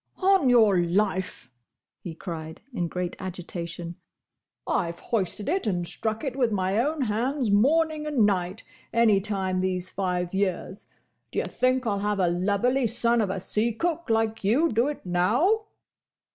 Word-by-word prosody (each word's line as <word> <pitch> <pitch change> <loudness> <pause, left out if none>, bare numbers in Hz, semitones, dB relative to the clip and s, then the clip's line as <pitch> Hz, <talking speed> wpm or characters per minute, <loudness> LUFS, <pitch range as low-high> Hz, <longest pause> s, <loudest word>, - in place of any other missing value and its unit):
"On 380 -8 +4
your 220 -6 +5
life!" 185 -6 -1 0.5
he 165 -3 -8
cried, 160 -2 -7
in 175 -7 -1
great 180 +1 -4
agitation. 175 -2 -6 0.7
"I've 170 -2 -1
hoisted 205 -2 -2
it 370 - 0
and 175 -4 -1
struck 220 - -2
it 270 -4 -3
with 245 -4 +1
my 190 +1 0
own 295 +4 0
hands, 240 +2 0
morning 305 +8 +2
and 270 -8 +3
night, 190 0 -1 0.3
any 230 -4 +4
time 190 -2 -1
these 185 -1 -2
five 180 -2 -2
years. 190 0 -2 0.4
D' - - -14
ye - - +2
think 255 0 0
I'll 205 -3 0
have 205 0 -1
a 180 -2 +3
lubberly 205 +9 +1
son 235 +1 +2
of 205 - 0
a 190 - -2
sea 215 +5 0
cook 335 +3 -2
like 225 -1 0
you 260 +12 +3
do 235 +2 +2
it 295 -7 -5
now?" 240 - +2
210 Hz, 160 wpm, -26 LUFS, 185-245 Hz, 0.7 s, your